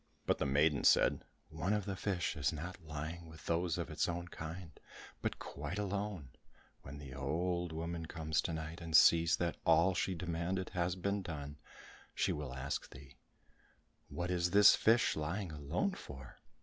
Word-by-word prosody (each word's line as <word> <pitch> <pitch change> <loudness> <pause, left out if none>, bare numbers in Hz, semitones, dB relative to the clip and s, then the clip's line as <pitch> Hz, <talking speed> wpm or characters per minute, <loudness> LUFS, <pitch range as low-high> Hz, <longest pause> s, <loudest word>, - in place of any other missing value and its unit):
But - - +1
the - - +1
maiden 70 +1 +3
said, - - +5 0.3
"One 80 +6 -1
of 105 -2 0
the 100 - -3
fish 90 -3 -1
is 70 -3 +1
not 85 +4 -6
lying 80 +2 -6
with 80 -1 -13
those 85 0 0
of - - -4
its - - 0
own 85 +1 -4
kind, 80 +1 -7 0.5
but - - -2
quite 75 +7 -6
alone; 100 -7 -3 0.5
when 70 +2 -9
the 70 -3 -9
old 85 +6 -1
woman 80 +1 -4
comes 80 -2 -1
to 85 - -3
night 80 +1 -5
and 80 -1 +4
sees 85 +1 +6
that 85 -1 -2
all 95 +3 +5
she 95 0 -1
demanded 85 +2 -2
has 90 0 0
been 100 +2 -1
done, 75 -4 -6 0.6
she - - +1
will 70 -4 -5
ask 65 +2 -3
thee, 65 0 -14 0.9
'What 90 +1 -3
is 90 -1 +1
this 100 +3 +8
fish 115 +2 +3
lying 85 +4 -3
alone 75 - -1
for? 65 - -10
85 Hz, 170 wpm, -35 LUFS, 75-90 Hz, 0.9 s, this